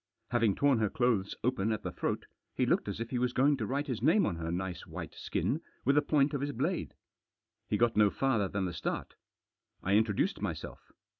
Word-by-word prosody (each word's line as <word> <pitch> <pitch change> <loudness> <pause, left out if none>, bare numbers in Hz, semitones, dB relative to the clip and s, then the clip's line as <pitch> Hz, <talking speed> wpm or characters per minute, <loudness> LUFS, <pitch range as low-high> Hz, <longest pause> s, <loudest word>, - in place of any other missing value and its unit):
Having 115 -5 +3
torn 140 -4 +3
her 110 -2 +2
clothes 115 -6 +1
open 115 -3 +1
at 110 - -2
the - - -3
throat, - - -2 0.3
he - - +2
looked - - +1
as - - -3
if 115 0 -4
he 125 - 0
was 125 0 0
going 140 +3 +4
to 110 -5 -2
write 140 +2 -1
his 125 -7 -3
name 165 - +4
on 85 - -1
her 80 0 -3
nice 90 0 -4
white - - -7
skin - - -1 0.2
with 140 - +4
the 150 - +6
point 150 -1 +2
of 140 - -1
his 145 0 -2
blade. - - -2 0.7
He 105 - +2
got 115 0 +2
no 105 -1 +5
farther 115 -4 +1
than 100 0 -2
the 90 - -3
start. - - -3 0.7
I 95 - +1
introduced 105 -1 +2
myself. - - -5
115 Hz, 215 wpm, -31 LUFS, 100-135 Hz, 0.7 s, the